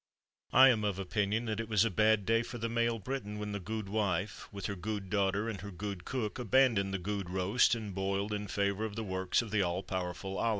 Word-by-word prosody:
I 135 +1 +8
am 110 -4 +2
of 100 -3 0
opinion 105 +4 0
that 110 -1 -2
it 115 -1 -4
was 105 0 +4
a 115 - 0
bad 110 +1 +3
day 115 +2 +3
for 120 +1 -6
the 115 0 -2
male 115 0 +1
Briton 105 -2 -4
when 105 0 -4
the 100 - -3
gudewife, 100 -2 -2
with 100 -2 -6
her 100 - -1
gude 100 0 -4
daughter, 100 +1 +1
and 110 -4 -4
her 100 - -6
gude 100 -1 -6
cook, 125 -3 -3
abandoned 120 -5 +3
the 95 - -1
gude 100 0 -3
roast 95 +7 +3
and 105 -4 -5
boiled, 100 +2 -1
in 105 0 -3
favour 100 +1 0
of 110 -2 -3
the 115 - -3
works 95 +2 0
of 110 - -8
the 105 -2 +2
all 90 +1 -1
powerful 95 +1 -4
Ala. 115 - +2
105 Hz, 230 wpm, -32 LUFS, 95-110 Hz, -, I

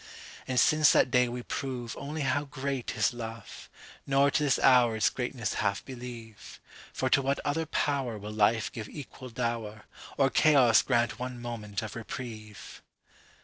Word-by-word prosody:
'…And 125 -1 +1
since 155 -1 +5
that 125 - +3
day 125 -1 +3
we 120 0 -5
proveOnly 135 +4 -5
how 140 +2 0
great 135 -2 -4
is - - +1
love, 115 -2 -8 0.4
Nor 140 +1 +3
to - - +1
this 140 -2 +2
hour 125 -3 +5
its 110 - +2
greatness 125 -3 -3
half 100 -1 -1
believe. 120 -4 -10 0.3
For 130 - -2
to 140 - +5
what 135 +1 0
other 160 +2 -1
powerWill 120 -9 -2
life 110 +1 +2
give 110 -2 -7
equal 135 -3 -9
dower, 115 -3 -3 0.3
Or 135 -1 +3
chaos 135 -7 +5
grant 120 -3 0
one 125 -1 -5
moment 110 -4 -5
of 110 - -7
reprieve! 110 -2 -8
125 Hz, 150 wpm, -29 LUFS, 115-135 Hz, 0.4 s, since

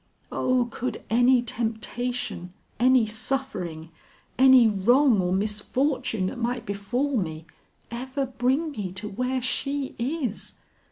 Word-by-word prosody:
O, 255 -1 +1
could 255 +3 -4
any 245 +1 +5
temptation, 230 -4 -3 0.3
any 255 -1 +5
suffering, 210 -9 -4 0.4
any 260 -2 +7
wrong 225 +3 +4
or 180 0 -1
misfortune 215 +3 0
that 240 +6 -4
might 245 +1 -2
befall 240 +7 -1
me, 160 -5 -3 0.5
ever 260 +3 -3
bring 260 +5 0
me 205 -9 -4
to 190 +3 -5
where 250 +5 -2
she 275 +2 -1
is! 255 -3 -3
245 Hz, 115 wpm, -26 LUFS, 210-260 Hz, 0.5 s, any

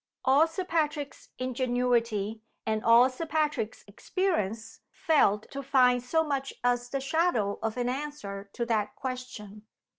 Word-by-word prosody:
All 280 +5 +5
Sir 330 +3 -4
Patrick's 300 -4 -2
ingenuity, 240 -4 0 0.2
and 220 -1 -1
all 235 +2 +7
Sir 265 +6 -6
Patrick's 300 -8 -1
experience, 225 - -2
failed 300 - +2
to 275 - -5
find 250 -2 +4
so 320 +6 +1
much 275 -3 -3
as 245 0 +1
the 275 - -2
shadow 270 - 0
of 225 +1 -2
an 245 -1 0
answer 250 -8 -5
to 235 - -2
that 215 -3 -1
question. 250 -5 -7
250 Hz, 140 wpm, -28 LUFS, 225-290 Hz, 0.2 s, all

